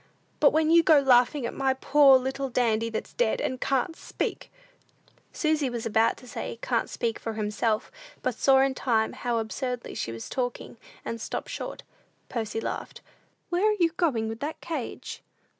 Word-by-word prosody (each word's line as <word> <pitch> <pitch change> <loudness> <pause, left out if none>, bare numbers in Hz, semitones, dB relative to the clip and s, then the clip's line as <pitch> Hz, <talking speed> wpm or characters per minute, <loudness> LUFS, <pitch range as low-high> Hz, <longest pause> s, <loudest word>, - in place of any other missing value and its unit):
But 290 - +7
when 315 +1 +2
you 335 0 +7
go 315 -2 +6
to - - -9
laughing 250 +2 +4
at - - -3
my 265 -1 +1
poor 275 0 +6
little 265 +1 -3
Dandy 230 -2 +1
that's 225 - -5
dead, - - +1
and 260 - -2
can't 275 +5 0
speak - - -4 0.4
" - - -39 0.3
Susy 310 -4 0
was 240 -2 -4
about 225 +1 +2
to 250 - -14
say, 230 - -5
"Can't 235 -1 -1
speak 230 -1 -2
for 225 - -4
himself," 215 +1 -1 0.3
but 255 - 0
saw 265 +3 +4
in 270 0 +2
time 225 -4 0
how 240 -1 -2
absurdly 240 +2 -3
she 115 - -3
was 115 0 -7
talking, 245 -2 -4 0.3
and 230 -1 -4
stopped - - -4
short. - - -6 0.5
Percy 225 -2 -3
laughed. - - -5 0.5
"Where 365 +5 +2
are 425 - +1
you 335 -2 +3
going 290 -10 0
with 225 0 -5
that 295 +4 -4
cage?" 310 -8 -5
255 Hz, 180 wpm, -27 LUFS, 230-290 Hz, 0.5 s, But